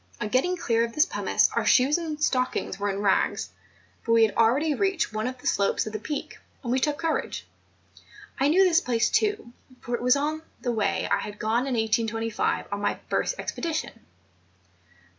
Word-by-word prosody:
On 210 Hz, -, -3 dB
getting 355 Hz, +10 st, +1 dB
clear 230 Hz, -7 st, +1 dB
of 230 Hz, 0 st, -4 dB
this 305 Hz, -, +5 dB
pumice -, -, +1 dB
our -, -, +1 dB
shoes 270 Hz, +3 st, +4 dB
and 315 Hz, -3 st, -5 dB
stockings 255 Hz, -8 st, -1 dB
were 205 Hz, 0 st, -1 dB
in 200 Hz, 0 st, -3 dB
rags; 195 Hz, -, +1 dB, 0.5 s
but 230 Hz, -, +1 dB
we 230 Hz, 0 st, +6 dB
had 220 Hz, -, +2 dB
already 265 Hz, +7 st, +3 dB
reached 385 Hz, -, 0 dB
one 215 Hz, +2 st, -2 dB
of 255 Hz, 0 st, -5 dB
the 250 Hz, -, -18 dB
slopes 200 Hz, -, +1 dB
of 215 Hz, -, -6 dB
the 215 Hz, -, -3 dB
Peak, 290 Hz, +7 st, -5 dB, 0.2 s
and 240 Hz, -, -3 dB
we 260 Hz, -, +2 dB
took 295 Hz, +2 st, 0 dB
courage. 330 Hz, -1 st, -2 dB, 0.9 s
I 275 Hz, -, +3 dB
knew 355 Hz, +6 st, +5 dB
this 350 Hz, -3 st, +4 dB
place 235 Hz, -1 st, +1 dB
too, 415 Hz, -, 0 dB, 0.3 s
for 240 Hz, -, -6 dB
it 240 Hz, -, -1 dB
was 250 Hz, +3 st, +4 dB, 0.4 s
the 245 Hz, -, -2 dB
way 200 Hz, -4 st, 0 dB
I -, -, +3 dB
had 210 Hz, 0 st, -7 dB
gone 230 Hz, +5 st, 0 dB
in 260 Hz, -, -1 dB
1825 225 Hz, 0 st, 0 dB
on 200 Hz, 0 st, -3 dB
my -, -, 0 dB
first -, -, 0 dB
expedition. 325 Hz, -2 st, -3 dB
245 Hz, 190 wpm, -26 LUFS, 220-300 Hz, 0.9 s, we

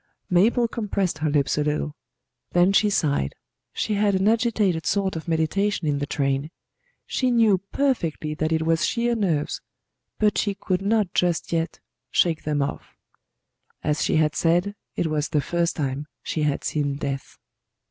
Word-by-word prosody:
Mabel 230 Hz, +7 st, +4 dB
compressed 200 Hz, -5 st, -2 dB
her 155 Hz, 0 st, 0 dB
lips 145 Hz, 0 st, +1 dB
a -, -, +2 dB
little; 150 Hz, 0 st, -1 dB, 0.6 s
then 175 Hz, +2 st, +4 dB
she 210 Hz, +1 st, +4 dB
sighed. 145 Hz, -, 0 dB, 0.4 s
She 215 Hz, -, -2 dB
had 205 Hz, -1 st, +2 dB
an 190 Hz, +2 st, +2 dB
agitated 215 Hz, -7 st, +2 dB
sort 195 Hz, -2 st, +1 dB
of 160 Hz, +2 st, -6 dB
meditation 165 Hz, +3 st, 0 dB
in 145 Hz, -1 st, +1 dB
the 145 Hz, -, -2 dB
train. 140 Hz, 0 st, -1 dB, 0.6 s
She 255 Hz, -, 0 dB
knew 225 Hz, -5 st, +4 dB
perfectly 170 Hz, -, 0 dB
that 155 Hz, +1 st, -1 dB
it 160 Hz, 0 st, +1 dB
was 165 Hz, 0 st, +2 dB
sheer 240 Hz, 0 st, +1 dB
nerves; 175 Hz, -10 st, 0 dB, 0.6 s
but 210 Hz, -1 st, +2 dB
she 205 Hz, -1 st, 0 dB
could 185 Hz, -1 st, -1 dB
not 205 Hz, -2 st, +1 dB
just 175 Hz, -1 st, 0 dB
yet 165 Hz, 0 st, -1 dB, 0.3 s
shake 165 Hz, +5 st, +1 dB
them 150 Hz, -2 st, +1 dB
off. 140 Hz, -, -6 dB, 0.9 s
As 150 Hz, 0 st, 0 dB
she -, -, +1 dB
had 155 Hz, -1 st, +3 dB
said, 175 Hz, +4 st, +2 dB, 0.2 s
it -, -, 0 dB
was 155 Hz, -1 st, -1 dB
the 150 Hz, -, +2 dB
first 170 Hz, +4 st, 0 dB
time 140 Hz, 0 st, -2 dB, 0.2 s
she 155 Hz, -, -2 dB
had 150 Hz, -2 st, 0 dB
seen 145 Hz, -2 st, -1 dB
death. 140 Hz, -1 st, -5 dB
170 Hz, 165 wpm, -24 LUFS, 150-200 Hz, 0.9 s, Mabel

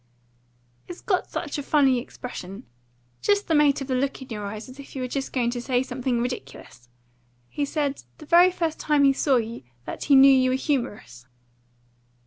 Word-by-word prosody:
"It's 355 Hz, -, -8 dB
got 370 Hz, -3 st, -1 dB
such 295 Hz, -2 st, -4 dB
a -, -, -2 dB
funny 270 Hz, -3 st, +3 dB
expression 200 Hz, -6 st, -8 dB, 0.6 s
just 410 Hz, 0 st, +1 dB
the 325 Hz, -, +1 dB
mate 295 Hz, -2 st, +3 dB
of 270 Hz, -, -5 dB
the 265 Hz, -, -1 dB
look 270 Hz, +2 st, -1 dB
in 265 Hz, -, -11 dB
your 210 Hz, -3 st, -5 dB
eyes; 215 Hz, +2 st, -7 dB
as 260 Hz, +2 st, -13 dB
if 280 Hz, -, -12 dB
you 265 Hz, -, -4 dB
were -, -, -2 dB
just 270 Hz, +2 st, -4 dB
going 240 Hz, -2 st, 0 dB
to 245 Hz, 0 st, -4 dB
say 250 Hz, 0 st, 0 dB
something 250 Hz, -1 st, -2 dB
ridiculous. 135 Hz, -, -6 dB, 0.6 s
He 290 Hz, -, -2 dB
said, 285 Hz, -1 st, -2 dB, 0.2 s
the 305 Hz, -, -12 dB
very 345 Hz, +4 st, +6 dB
first 335 Hz, -3 st, -3 dB
time 295 Hz, -2 st, +2 dB
he 275 Hz, -1 st, +5 dB
saw 270 Hz, 0 st, +2 dB
you, 230 Hz, -1 st, -2 dB, 0.2 s
that -, -, -6 dB
he 285 Hz, -, +5 dB
knew 270 Hz, +1 st, +8 dB
you 255 Hz, -1 st, +3 dB
were 255 Hz, -, +1 dB
humorous." 220 Hz, -, -3 dB
265 Hz, 195 wpm, -24 LUFS, 245-290 Hz, 0.6 s, knew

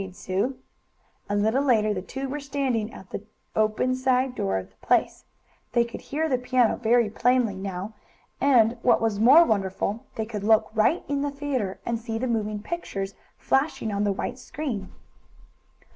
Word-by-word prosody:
"All -, -, -3 dB
right!" -, -, -8 dB
agreed 180 Hz, -, -17 dB
Sue. 200 Hz, +8 st, -1 dB, 0.7 s
A 205 Hz, -, 0 dB
little 220 Hz, +6 st, +2 dB
later 215 Hz, -6 st, +3 dB
the 185 Hz, -, -3 dB
two 270 Hz, +7 st, -5 dB
were 290 Hz, +3 st, -4 dB
standing 265 Hz, -6 st, -1 dB
at 190 Hz, -, -13 dB
the -, -, -4 dB, 0.3 s
open, 215 Hz, +4 st, +2 dB
side 255 Hz, 0 st, +1 dB
door 95 Hz, -, -1 dB
of 95 Hz, 0 st, -6 dB
the -, -, -31 dB
place. -, -, +1 dB, 0.5 s
They 235 Hz, -1 st, +4 dB
could 235 Hz, -, -8 dB
hear 315 Hz, +3 st, -2 dB
the 255 Hz, -5 st, +1 dB
piano 250 Hz, -2 st, +2 dB
very 235 Hz, 0 st, +3 dB
plainly 240 Hz, 0 st, +2 dB
now, 190 Hz, +2 st, -5 dB, 0.5 s
and, 245 Hz, -4 st, +4 dB
what 240 Hz, -2 st, +4 dB
was 220 Hz, -3 st, 0 dB
more 280 Hz, +10 st, +8 dB
wonderful, 200 Hz, -, -1 dB
they 220 Hz, -, -2 dB
could 215 Hz, -2 st, -5 dB
look 220 Hz, +1 st, +3 dB
right 220 Hz, +11 st, +2 dB
in 285 Hz, -1 st, -1 dB
the 290 Hz, -, 0 dB
theatre 275 Hz, -9 st, -3 dB
and 235 Hz, -1 st, -1 dB
see 225 Hz, -1 st, -4 dB
the 250 Hz, -, -2 dB
moving 215 Hz, -3 st, -2 dB
pictures 195 Hz, -, -4 dB, 0.2 s
flashing 270 Hz, -5 st, 0 dB
on 200 Hz, 0 st, 0 dB
the 205 Hz, -, +2 dB
white 200 Hz, +6 st, -4 dB
screen. 250 Hz, -9 st, -5 dB
230 Hz, 185 wpm, -25 LUFS, 205-260 Hz, 0.7 s, more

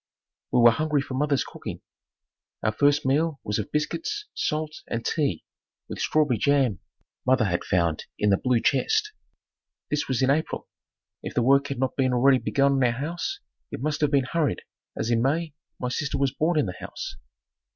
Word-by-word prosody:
We 125 Hz, -, +4 dB
were 120 Hz, 0 st, +8 dB
hungry 150 Hz, +3 st, 0 dB
for 135 Hz, -, -7 dB
mother's 140 Hz, 0 st, +1 dB
cooking. -, -, -8 dB, 0.8 s
Our 110 Hz, -, +2 dB
first 145 Hz, +6 st, +2 dB
meal 145 Hz, +2 st, +1 dB
was 105 Hz, +1 st, -1 dB
of 105 Hz, -, -4 dB
biscuits, 370 Hz, -, -2 dB
salt 155 Hz, 0 st, -2 dB
and 115 Hz, 0 st, -3 dB
tea 140 Hz, -, 0 dB, 0.4 s
with -, -, -7 dB
strawberry 150 Hz, -7 st, +2 dB
jam, 135 Hz, -9 st, +2 dB, 0.4 s
mother 130 Hz, -3 st, +3 dB
had 85 Hz, -3 st, -1 dB
found 85 Hz, -4 st, 0 dB
in 105 Hz, -, +2 dB
the 95 Hz, -, +4 dB
blue 125 Hz, 0 st, +1 dB
chest. 425 Hz, -, +1 dB, 0.8 s
This 150 Hz, -, 0 dB
was 130 Hz, -1 st, 0 dB
in 130 Hz, -, +4 dB
April. 155 Hz, +3 st, -1 dB, 0.5 s
If -, -, -7 dB
the 120 Hz, -, +2 dB
work 140 Hz, +3 st, +4 dB
had 140 Hz, -, -4 dB
not 130 Hz, -1 st, -1 dB
been 130 Hz, -2 st, +1 dB
already 130 Hz, +1 st, +5 dB
begun 140 Hz, +2 st, +2 dB
on 135 Hz, -1 st, +2 dB
our 125 Hz, -, +4 dB
house, 170 Hz, -, -4 dB, 0.3 s
it -, -, -6 dB
must 155 Hz, 0 st, -1 dB
have 150 Hz, -, +3 dB
been 140 Hz, -2 st, +2 dB
hurried 155 Hz, +1 st, -1 dB, 0.3 s
as 115 Hz, +2 st, -1 dB
in 115 Hz, -1 st, +3 dB
May 155 Hz, +4 st, 0 dB, 0.3 s
my 125 Hz, -, -2 dB
sister 140 Hz, +3 st, -2 dB
was 135 Hz, -1 st, +1 dB
born 160 Hz, +3 st, +1 dB
in 150 Hz, -, +3 dB
the 90 Hz, -, -4 dB
house. -, -, -7 dB
140 Hz, 185 wpm, -25 LUFS, 125-150 Hz, 0.8 s, were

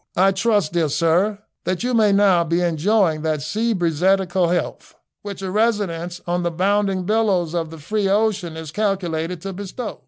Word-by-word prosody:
I 190 Hz, +2 st, +4 dB
trust, 200 Hz, -4 st, +1 dB
dear 165 Hz, -3 st, +1 dB
sir, 175 Hz, +7 st, +1 dB, 0.3 s
that 185 Hz, +3 st, -2 dB
you 250 Hz, +1 st, -1 dB
may 215 Hz, -3 st, +4 dB
now 195 Hz, -3 st, +4 dB
be 170 Hz, +2 st, 0 dB
enjoying 175 Hz, 0 st, +1 dB
that 155 Hz, -2 st, -1 dB
seabreezetical 185 Hz, -2 st, +1 dB
health 175 Hz, -, -3 dB, 0.3 s
which 200 Hz, -1 st, -7 dB
a 190 Hz, -, -3 dB
residence 190 Hz, -5 st, -1 dB
on 175 Hz, +1 st, -1 dB
the 175 Hz, -, 0 dB
bounding 195 Hz, +2 st, 0 dB
billows 195 Hz, -5 st, +1 dB
of 165 Hz, -2 st, -2 dB
the 160 Hz, -, -10 dB
free 200 Hz, +6 st, -1 dB
ocean 200 Hz, -5 st, 0 dB
is 160 Hz, -2 st, -7 dB
calculated 180 Hz, -4 st, -2 dB
to 195 Hz, +1 st, -5 dB
bestow. 205 Hz, +4 st, -6 dB
185 Hz, 165 wpm, -21 LUFS, 170-205 Hz, 0.3 s, I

